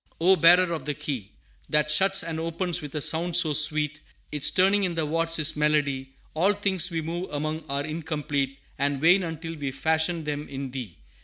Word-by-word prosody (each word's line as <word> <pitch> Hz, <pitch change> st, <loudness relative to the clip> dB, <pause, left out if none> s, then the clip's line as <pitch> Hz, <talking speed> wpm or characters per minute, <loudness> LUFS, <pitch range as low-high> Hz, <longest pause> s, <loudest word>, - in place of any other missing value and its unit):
"O 185 Hz, +3 st, +4 dB
Bearer 175 Hz, +1 st, +4 dB
of 160 Hz, -, -6 dB
the 150 Hz, -1 st, -3 dB
key 120 Hz, -10 st, -6 dB, 0.4 s
That 150 Hz, -1 st, +1 dB
shuts 195 Hz, +4 st, +4 dB
and 165 Hz, -1 st, -5 dB
opens 165 Hz, +2 st, -2 dB
with 150 Hz, -1 st, -9 dB
a 150 Hz, -, 0 dB
sound 170 Hz, +1 st, +2 dB
so 165 Hz, -4 st, +8 dB
sweet 150 Hz, 0 st, +4 dB, 0.3 s
Its 150 Hz, -1 st, +3 dB
turning 195 Hz, +2 st, +1 dB
in 180 Hz, -3 st, -2 dB
the 160 Hz, -1 st, -1 dB
wards 165 Hz, +2 st, 0 dB
is 155 Hz, -1 st, +1 dB
melody, 145 Hz, -3 st, -1 dB, 0.2 s
All 185 Hz, +6 st, +1 dB
things 190 Hz, -4 st, 0 dB
we 165 Hz, -2 st, -4 dB
move 170 Hz, +3 st, -6 dB
among 155 Hz, +2 st, -5 dB
are 140 Hz, +1 st, -3 dB
incomplete 150 Hz, -3 st, -4 dB, 0.2 s
And 140 Hz, -1 st, -1 dB
vain 175 Hz, +6 st, +4 dB
until 165 Hz, -1 st, -7 dB
we 145 Hz, -3 st, -5 dB
fashion 160 Hz, +4 st, -2 dB
them 150 Hz, 0 st, -5 dB
in 135 Hz, -1 st, -7 dB
Thee! 120 Hz, -11 st, -8 dB
155 Hz, 190 wpm, -24 LUFS, 145-170 Hz, 0.4 s, so